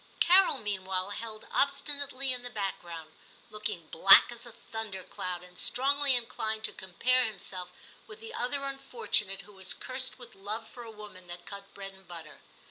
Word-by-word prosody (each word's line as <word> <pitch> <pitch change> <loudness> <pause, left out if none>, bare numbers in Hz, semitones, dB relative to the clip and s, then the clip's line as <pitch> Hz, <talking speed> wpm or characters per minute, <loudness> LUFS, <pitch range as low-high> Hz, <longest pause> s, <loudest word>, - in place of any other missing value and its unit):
Carol 370 -3 +6
meanwhile 190 -3 -2
held 215 0 -6
obstinately 280 -1 +1
in 250 - -4
the 245 - -6
background, 175 -7 -5 0.4
looking 210 -6 -2
black 195 +7 +8
as 240 0 -6
a - - -10
thunder 220 -4 -5
cloud, 180 -1 -5
and 180 0 -10
strongly 280 +1 +3
inclined 220 -2 0
to - - 0
compare 250 +8 +2
himself 185 -3 -3 0.4
with 430 0 -10
the 455 0 -9
other 275 +3 0
unfortunate 235 -8 -1
who 205 +2 -16
was 190 -1 0
cursed 260 0 -1
with 245 -2 -10
love 210 +3 -3
for 245 - -11
a 230 - -9
woman 210 -4 -11
that 175 0 -7
cut 200 0 -8
bread 195 -1 -7
and 190 -1 -18
butter. 165 -3 -9
215 Hz, 170 wpm, -30 LUFS, 190-255 Hz, 0.4 s, black